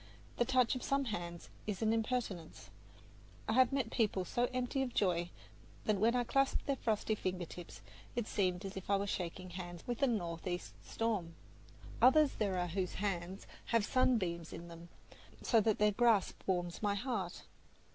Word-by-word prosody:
The 240 Hz, -, +3 dB
touch 255 Hz, -1 st, +3 dB
of 255 Hz, -, -3 dB
some 275 Hz, +2 st, +1 dB
hands 175 Hz, -6 st, -4 dB, 0.2 s
is 210 Hz, -1 st, -2 dB
an 220 Hz, 0 st, +3 dB
impertinence. 225 Hz, -7 st, -2 dB, 0.8 s
I 220 Hz, -, +1 dB
have 255 Hz, +2 st, +5 dB
met 270 Hz, -5 st, 0 dB
people 200 Hz, -5 st, +1 dB
so 240 Hz, +6 st, +1 dB
empty 255 Hz, +2 st, -1 dB
of 255 Hz, -3 st, -3 dB
joy, 175 Hz, -3 st, +2 dB, 0.6 s
that 210 Hz, -2 st, +2 dB
when 230 Hz, +4 st, +4 dB
I 245 Hz, -, +3 dB
clasped 275 Hz, +3 st, +1 dB
their 280 Hz, -, +1 dB
frosty 220 Hz, -2 st, 0 dB
finger 185 Hz, -4 st, -2 dB
tips, 175 Hz, +1 st, -10 dB, 0.3 s
it 240 Hz, -2 st, 0 dB
seemed 185 Hz, -3 st, 0 dB
as 195 Hz, -, -6 dB
if 190 Hz, 0 st, -7 dB
I 200 Hz, -, +4 dB
were 200 Hz, -, -1 dB
shaking 185 Hz, -1 st, -4 dB
hands 175 Hz, -1 st, -7 dB
with 245 Hz, +1 st, -3 dB
a 275 Hz, -, +5 dB
northeast 175 Hz, -5 st, -2 dB
storm. 205 Hz, -8 st, -2 dB, 0.7 s
Others 285 Hz, +3 st, +7 dB
there 195 Hz, -3 st, +1 dB
are 180 Hz, 0 st, 0 dB
whose 180 Hz, +1 st, -2 dB
hands 190 Hz, -2 st, -3 dB, 0.2 s
have 230 Hz, -3 st, +2 dB
sunbeams 185 Hz, -11 st, +1 dB
in 170 Hz, +1 st, -8 dB
them, 170 Hz, 0 st, -11 dB, 0.5 s
so 225 Hz, -3 st, +4 dB
that 215 Hz, 0 st, +2 dB
their 210 Hz, 0 st, +4 dB
grasp 225 Hz, -2 st, +3 dB
warms 175 Hz, -2 st, -1 dB
my 205 Hz, -1 st, +1 dB
heart. 205 Hz, -5 st, -3 dB
205 Hz, 175 wpm, -35 LUFS, 180-240 Hz, 0.8 s, Others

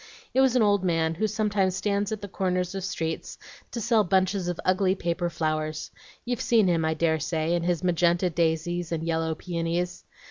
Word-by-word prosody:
It 265 Hz, -, +4 dB
was 265 Hz, -2 st, +3 dB
an 245 Hz, -, +5 dB
old 205 Hz, -2 st, +3 dB
man, 165 Hz, -2 st, +1 dB
who 215 Hz, +7 st, 0 dB
sometimes 205 Hz, -3 st, 0 dB
stands 205 Hz, +1 st, 0 dB
at 215 Hz, -1 st, -3 dB
the -, -, -4 dB
corners 185 Hz, -1 st, -1 dB
of 195 Hz, -1 st, -4 dB
streets 160 Hz, -3 st, -3 dB, 0.3 s
to 235 Hz, -, -5 dB
sell 230 Hz, -1 st, +3 dB
bunches 190 Hz, 0 st, +1 dB
of 175 Hz, -1 st, -3 dB
ugly 185 Hz, 0 st, +3 dB
paper 175 Hz, -1 st, -1 dB
flowers. 155 Hz, -1 st, -2 dB, 0.3 s
You've 245 Hz, -1 st, -2 dB
seen 230 Hz, -4 st, +4 dB
him, 170 Hz, -2 st, +2 dB
I 160 Hz, 0 st, +1 dB
dare 160 Hz, 0 st, +1 dB
say, 160 Hz, +2 st, -1 dB
and 175 Hz, -1 st, 0 dB
his 175 Hz, 0 st, 0 dB
magenta 175 Hz, 0 st, +2 dB
daisies 170 Hz, +1 st, 0 dB
and 165 Hz, -1 st, -2 dB
yellow 160 Hz, -1 st, -1 dB
peonies. 170 Hz, +1 st, -3 dB
175 Hz, 190 wpm, -26 LUFS, 165-200 Hz, 0.3 s, an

